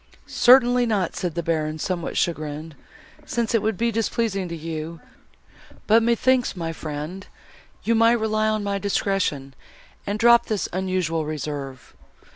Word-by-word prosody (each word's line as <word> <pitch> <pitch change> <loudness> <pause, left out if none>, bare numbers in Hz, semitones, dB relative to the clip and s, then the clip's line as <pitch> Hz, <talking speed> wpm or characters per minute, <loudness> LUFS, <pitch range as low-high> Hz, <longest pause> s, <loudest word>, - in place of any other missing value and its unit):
"Certainly 245 -1 +5
not," 200 -6 0
said 175 -3 -3
the 170 - -2
Baron, 155 -1 -1
somewhat 170 +1 -3
chagrined, 155 -1 -2 0.5
"since 235 -2 -2
it 230 - +3
would 215 -2 -1
be 235 +1 +1
displeasing 220 -4 -1
to 170 - -4
you; 160 +1 -6 0.9
but 225 +2 +5
methinks, 240 +2 +2
my 165 -2 -4
friend, 155 +5 -6 0.6
you 230 - +2
might 230 +1 +4
rely 215 0 0
on 215 -1 0
my 200 -1 -1
discretion, 195 -9 -1 0.5
and 205 +1 -1
drop 235 +1 +5
this 215 -3 -1
unusual 185 -3 -1
reserve. 145 -3 -6
190 Hz, 140 wpm, -23 LUFS, 160-225 Hz, 0.9 s, Certainly